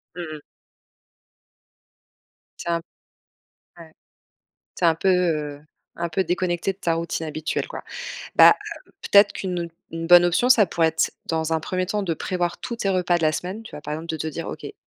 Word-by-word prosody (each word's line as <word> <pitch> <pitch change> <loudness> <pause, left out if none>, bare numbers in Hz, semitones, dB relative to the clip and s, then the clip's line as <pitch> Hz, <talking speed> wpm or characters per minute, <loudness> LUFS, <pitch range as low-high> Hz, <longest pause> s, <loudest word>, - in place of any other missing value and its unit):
Mmh 175 - -5
mh. - - -15 2.2
Tu - - -7
es - - +2
un 170 0 0 1.0
ouais. 160 -1 -13 0.8
Tu 180 - -2
es - - +7
un 165 - +5
peu, 180 +4 -1
heu, 155 -5 0 0.4
un 170 0 -2
peu 180 +4 0
déconnectée 180 +1 -1
de 195 - -26
ta 170 -3 0
routine 165 0 -3
habituelle, 155 0 -3
quoi. - - -8 0.5
Bah, - - +9 0.5
peut-être 205 0 +6
qu'une 180 -3 -3 0.2
une 165 0 -4
bonne 175 0 +8
option, 175 +8 +2
ça 230 -5 +6
pourrait 165 -1 +2
être, 160 0 0
dans 160 0 -1
un 160 - +2
1er 185 +3 -2
temps, 205 +2 -1
de 170 -3 -1
prévoir 175 +1 -2
tous 235 - -5
tes 205 - -2
repas 180 -1 +2
de - - -6
la 155 -1 +3
semaine, 185 +7 -4
tu - - -12
vois? - - -7
Par 150 - -5
exemple, 160 +2 -6
de 160 - -2
te 160 - -3
dire: 155 - -5
«OK, - - -7
heu, - - -6
170 Hz, 200 wpm, -23 LUFS, 160-185 Hz, 2.2 s, Bah